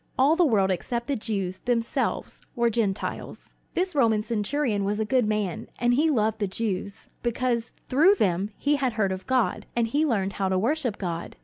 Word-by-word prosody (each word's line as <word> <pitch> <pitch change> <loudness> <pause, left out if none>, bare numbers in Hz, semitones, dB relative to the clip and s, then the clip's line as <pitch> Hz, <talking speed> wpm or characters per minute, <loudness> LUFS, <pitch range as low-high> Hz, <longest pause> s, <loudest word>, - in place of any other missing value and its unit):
All 280 +5 +5
the 355 - +4
world 195 -6 +3
except 235 +6 -2
the 280 - -1
Jews 195 -5 -3
themselves 235 -2 -1
were 235 -1 +2
Gentiles. 210 -4 -3 0.2
This 365 0 0
Roman 225 -7 +3
centurion 230 0 0
was 205 +2 -1
a 220 - +1
good 250 -1 +2
man, 210 -5 -2
and 240 +1 +2
he 305 +6 +3
loved 220 -5 +1
the 205 - 0
Jews, 200 0 -4 0.2
because 240 -1 -1
through 325 +10 +5
them 195 - +1
he 290 +1 +1
had 260 -4 0
heard 205 -3 +1
of 185 0 -5
God, 255 -2 +1
and 235 -1 +2
had 300 +5 +2
learned 195 -6 0
how 195 -1 -1
to 190 - +1
worship 245 +1 0
God. 170 -3 -4
225 Hz, 190 wpm, -26 LUFS, 200-255 Hz, 0.2 s, All